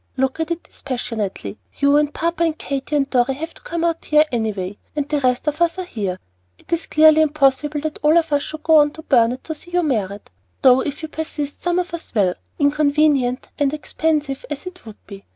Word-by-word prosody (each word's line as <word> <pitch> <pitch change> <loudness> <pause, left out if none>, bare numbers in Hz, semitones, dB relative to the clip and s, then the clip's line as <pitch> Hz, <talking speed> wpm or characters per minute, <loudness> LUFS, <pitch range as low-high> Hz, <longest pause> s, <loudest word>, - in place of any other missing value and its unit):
"Look 265 +3 0
at 320 0 -1
it 335 0 -3
dispassionately. 215 - -5 0.2
You 280 0 +4
and 295 0 +2
papa 335 +2 -1
and 320 -2 0
Katy 280 +1 -3
and 280 -2 +2
Dorry 255 0 +1
have 320 +4 -5
got - - -22
to - - -16
come 335 0 -3
out 335 -1 0
here 300 0 +5
any 220 -3 0
way, 190 0 -6 0.2
the 295 0 -1
rest 250 0 +1
of 300 +2 -2
us 340 +1 +2
are 370 - -3
here; 205 - -3 0.4
and - - -21
it - - -6
is 335 -1 -1
clearly 310 0 +6
impossible 295 -1 +2
that 310 0 -4
all 305 +2 +5
of 325 -3 +1
us 285 - +3
should 310 +1 -7
go 320 -1 +5
on 295 -1 +5
to 315 - -11
Burnet 245 -2 +2
to 320 - -4
see 315 +3 -12
you 355 0 +1
married, 205 - -1 0.4
though 255 0 +7
if 290 +3 -5
you - - -3
persist 300 -2 -5
some 350 0 0
of 360 0 -2
us 330 -7 -7
will, 190 -4 +3 0.2
inconvenient 285 -3 +2
and 290 0 +1
expensive 300 -2 -1
as 295 +2 -5
it 365 -9 -10
would 215 - -10
be. 200 -1 -11
295 Hz, 225 wpm, -20 LUFS, 255-315 Hz, 0.4 s, though